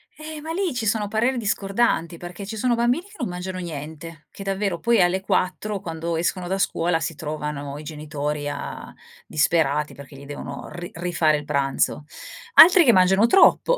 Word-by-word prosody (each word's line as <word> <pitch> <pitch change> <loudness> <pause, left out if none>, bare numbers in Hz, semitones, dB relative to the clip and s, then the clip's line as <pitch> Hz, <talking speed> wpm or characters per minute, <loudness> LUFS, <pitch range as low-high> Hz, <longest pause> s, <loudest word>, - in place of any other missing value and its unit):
Eh, 310 0 -8
ma 320 +2 -6
lì 360 -2 -1
ci 245 -3 -3
sono 210 0 0
pareri 230 +5 0
discordanti 200 -5 0
perché 175 +3 -8
ci 215 +3 -6
sono 245 +3 +1
bambini 240 +7 +1
che 415 +1 -16
non - - -2
mangiano 180 +1 -5
niente, 160 -1 -8
che - - -12
davvero 195 -2 -2
poi 235 0 +2
alle 180 +2 +2
4 195 +2 -1
quando 165 -1 -4
escono 175 +2 -1
da 190 +2 -1
scuola 170 -3 0
si 165 - -3
trovano 150 -2 -5
i 150 - -9
genitori 150 -1 -4
a 145 - -6 0.4
disperati 150 -1 +1
perché 140 0 -12
gli 140 +1 -11
devono 145 +1 -7
ri 175 0 -7
rifare 170 -3 +1
il 150 - -7
pranzo. 140 +1 0 0.5
Altri 355 +2 +9
che 240 - +5
mangiano 190 +3 +5
troppo. 440 - +5
175 Hz, 180 wpm, -23 LUFS, 155-215 Hz, 0.5 s, Altri